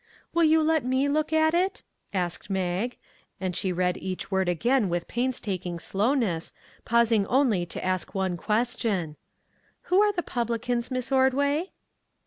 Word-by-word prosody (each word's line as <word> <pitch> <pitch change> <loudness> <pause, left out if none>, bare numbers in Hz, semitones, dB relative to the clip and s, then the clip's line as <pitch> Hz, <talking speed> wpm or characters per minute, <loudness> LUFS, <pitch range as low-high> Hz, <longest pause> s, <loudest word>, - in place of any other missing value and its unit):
" - - -34
Will 335 - +3
you 315 0 +4
let 315 -2 +2
me 260 +3 +1
look 305 +2 0
at 315 0 +3
it? 365 +3 0 0.2
" - - -50
asked 180 -1 -3
Mag, 190 +5 -1 0.4
and 185 -2 -2
she 185 0 0
read 180 0 0
each 185 +1 -5
word 190 -1 +1
again 220 +5 +2
with 175 0 -2
painstaking 205 -8 -2
slowness, 200 - 0 0.3
pausing 230 -3 +3
only 235 -10 +2
to - - -6
ask 185 +1 -2
one 190 -2 0
question: 210 -5 -1 0.3
" - - -39
Who 385 - +6
are 420 0 +4
the 355 -3 -3
publicans, 235 -1 -2
Miss 255 0 -3
Ordway 280 +6 +2
235 Hz, 160 wpm, -26 LUFS, 185-270 Hz, 0.4 s, Who